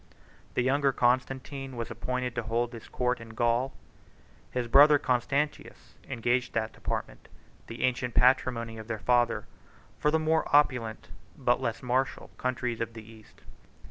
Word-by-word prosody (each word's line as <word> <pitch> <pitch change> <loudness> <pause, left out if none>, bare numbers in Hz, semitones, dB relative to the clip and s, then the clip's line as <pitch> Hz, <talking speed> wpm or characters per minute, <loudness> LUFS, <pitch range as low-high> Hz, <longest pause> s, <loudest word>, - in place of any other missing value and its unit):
The 125 - +2
younger 140 +2 +2
Constantine 130 +2 -1
was 115 - -4
appointed 125 -1 -3
to 125 - -2
hold 115 +2 -1
his 115 - -9
court 125 -1 -1
in 115 -1 -11
Gaul; 120 +3 +1
and - - -28
his 125 -1 -1
brother 145 +4 +7
Constantius 140 +3 -2 0.2
exchanged 120 +2 0
that 110 -1 -1
department, - - -5 0.4
the 115 - -6
ancient 125 -1 0
patrimony 115 -3 +2
of 110 - -9
their 110 -2 -3
father, 120 -1 +2 0.5
for 150 - +2
the 160 - +3
more 160 0 +2
opulent, 125 -7 +2 0.3
but 125 -1 +1
less 115 0 -3
martial, 130 +2 -1
countries 125 -2 -2
of 115 0 -3
the 110 -1 -9
East. 110 -1 -16
125 Hz, 150 wpm, -29 LUFS, 115-130 Hz, 0.5 s, brother